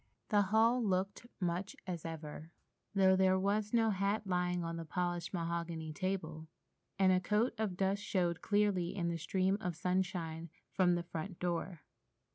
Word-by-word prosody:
The 205 -2 +4
hall 225 +5 +3
looked 195 +3 -1
much 180 +1 -2
as 175 -3 -4
ever, 160 -1 -6 0.5
though 190 -1 +6
there 190 0 +4
was 205 +2 0
no 225 -2 +3
hat 200 +2 0
lying 180 -1 0
on 165 0 -3
the 165 - -4
polished 175 +1 -2
mahogany 170 -2 -3
table, 160 -3 -3 0.5
and 190 -1 +5
a 185 - +4
coating 215 +5 +1
of 205 -5 -1
dust 195 +1 +1
showed 180 -4 0
clearly 205 -4 +1
in 170 -3 0
the 170 - -1
stream 190 +4 +1
of 180 -5 -2
sunshine 170 -2 -1 0.2
from 180 -2 +3
the 175 - -2
front 170 +2 -6
door. 175 -1 -2
185 Hz, 160 wpm, -35 LUFS, 170-195 Hz, 0.5 s, though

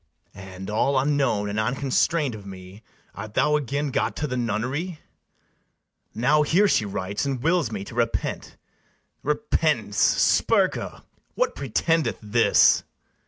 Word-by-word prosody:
And, 95 -1 -10
all 135 +6 +1
unknown 135 -7 +1
and 105 +1 -2
unconstrain'd 135 +4 0
of 105 -2 -9
me, 95 +1 -11 0.3
Art 105 +1 -9
thou 150 0 +3
again 145 0 -2
got - - -1
to 150 - -3
the 125 -4 -3
nunnery? 125 - -2 1.2
Now 130 +6 +3
here 180 +7 +3
she 115 - +2
writes, 100 0 -3
and 135 -3 -3
wills 165 -7 +1
me 100 -3 -4
to 100 - -11
repent: 115 -1 -2 0.6
Repentance! 150 - 0
Spurca! - - +2 0.3
what - - 0
pretendeth 155 +5 0
this? 110 +2 +4
125 Hz, 125 wpm, -24 LUFS, 105-150 Hz, 1.2 s, this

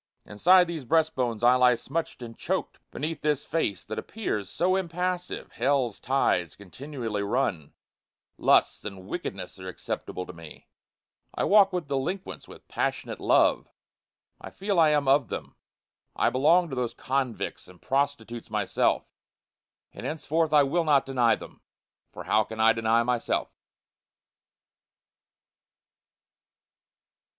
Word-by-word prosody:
Inside 180 - +5
these 165 -4 -5
breast 160 +5 +2
bones 120 -4 -2
I 120 +1 +7
lie 125 -1 +5
smutchâd 145 +1 -4
and 115 -1 -10
choked, - - -3
Beneath 155 +1 -4
this 150 -2 0
face 160 -12 -1
that 110 - -4
appears 170 - -4
so 185 +2 +1
impassive 180 0 -3
hellâs 130 -6 0
tides 90 - +1
continually 115 +1 -5
run, 100 - -1 0.6
Lusts - - +3
and 95 -3 -7
wickedness - - -6
are 95 - -8
acceptable 90 0 -5
to - - -10
me, 80 -2 -13 0.7
I - - -1
walk 200 -1 +5
with 180 -5 -3
delinquents 140 +8 -4
with - - -14
passionate - - -3
love, - - +3 0.7
I - - -9
feel 195 -2 -1
I 160 -2 +6
am 145 -2 +1
of 135 -2 +4
them - - -6 0.6
I - - +2
belong 165 +7 +3
to - - -3
those 125 -2 -2
convicts 130 -3 -3
and 90 -1 -16
prostitutes 135 -4 -2
myself, 105 -2 0 0.9
And - - -9
henceforth 160 0 -1
I 150 -2 +6
will 165 +5 +1
not 145 -4 +3
deny 125 -4 +3
them - - -13 0.5
for - - -10
how 110 +1 +3
can 110 +1 -9
I 110 +1 +5
deny 115 +1 +2
myself? 120 -1 -1
135 Hz, 135 wpm, -27 LUFS, 115-160 Hz, 0.9 s, I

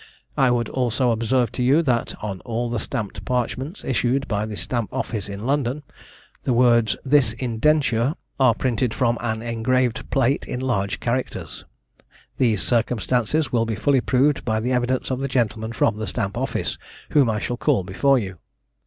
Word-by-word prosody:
I 135 - +4
would 120 -2 +1
also 125 -1 +1
observe 115 +1 +1
to - - -4
you 140 +7 +4
that 125 -5 0
on 100 -3 -4
all 120 +1 -3
the 120 - -1
stamped 100 -4 -4
parchments, 125 - -2
issued 130 +2 0
by 105 -1 -1
the 105 - -5
Stamp 120 -4 -3
office 105 -4 -3
in 100 +2 -6
London, 140 +1 0 0.6
the 130 - +1
words 120 -2 +4
"This 130 -5 +4
Indenture," 125 +2 +1 0.2
are 130 -4 +5
printed 125 -2 0
from 120 -2 +1
an 110 -1 -2
engraved 120 +1 0
plate 135 +1 +2
in 125 - -3
large 110 -7 -1
characters. 125 +2 -3 0.7
These 110 -7 +2
circumstances 125 +4 0
will 115 -2 +1
be 110 - -1
fully 135 +5 +2
proved 135 +4 +2
by 110 -2 0
the 125 +3 -1
evidence 125 +1 0
of 130 - -1
the 135 - -1
gentlemen 115 -4 -1
from 115 -1 +1
the 110 -1 -4
Stamp - - -2
office, - - -2 0.3
whom 140 -6 +4
I 110 - 0
shall 120 +2 -3
call 130 -7 +2
before 135 +9 +2
you. 95 -7 -4
120 Hz, 170 wpm, -23 LUFS, 110-130 Hz, 0.7 s, are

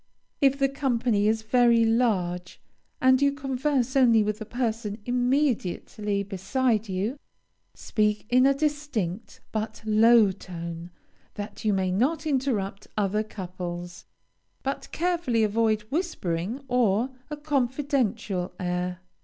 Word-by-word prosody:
If 275 -1 +4
the 275 -1 +3
company 245 -6 +1
is 220 0 +1
very 235 0 +4
large, 185 -7 0 0.4
and 260 +1 +4
you 280 0 +4
converse 270 -1 -1
only 235 -5 +5
with 210 +1 -2
the 220 - -7
person 225 -3 -2
immediately 245 - 0
beside 205 +3 0
you, 205 +9 -2 0.6
speak 210 -1 0
in 255 +3 +5
a 275 - +3
distinct, 275 - -2
but 220 0 -4
low 220 -1 +5
tone, 170 -2 -7 0.5
that 205 0 -7
you 215 - +2
may 190 -2 +1
not 285 - +1
interrupt 245 -9 -1
other 210 0 +1
couples, 175 -4 -7 0.6
but 275 +1 -4
carefully 335 -10 +1
avoid 215 0 +1
whispering 245 - -2
or 245 -1 +2 0.2
a 300 - -5
confidential 260 - -1
air. 180 0 -2
225 Hz, 120 wpm, -26 LUFS, 195-265 Hz, 0.6 s, only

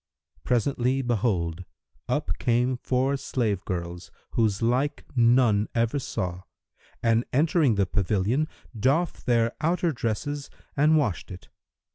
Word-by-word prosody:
Presently 125 +2 +1
behold, 95 -8 0 0.5
up - - -1
came 125 +2 +2
four 130 +3 0
slave 115 -8 -1
girls, 85 -1 -4 0.2
whose 110 -2 +1
like 130 +5 0
none 115 -3 +4
ever 115 +4 +1
saw, 90 -8 -4 0.6
and 115 0 +3
entering 150 -3 +3
the 100 -1 +2
pavilion, 105 - 0 0.3
doffed 135 +11 0
their 115 -1 +2
outer 170 +1 +1
dresses 140 +3 -3 0.3
and 155 +2 +4
washed 115 - -1
it. 90 -1 -10
120 Hz, 115 wpm, -26 LUFS, 105-135 Hz, 0.6 s, none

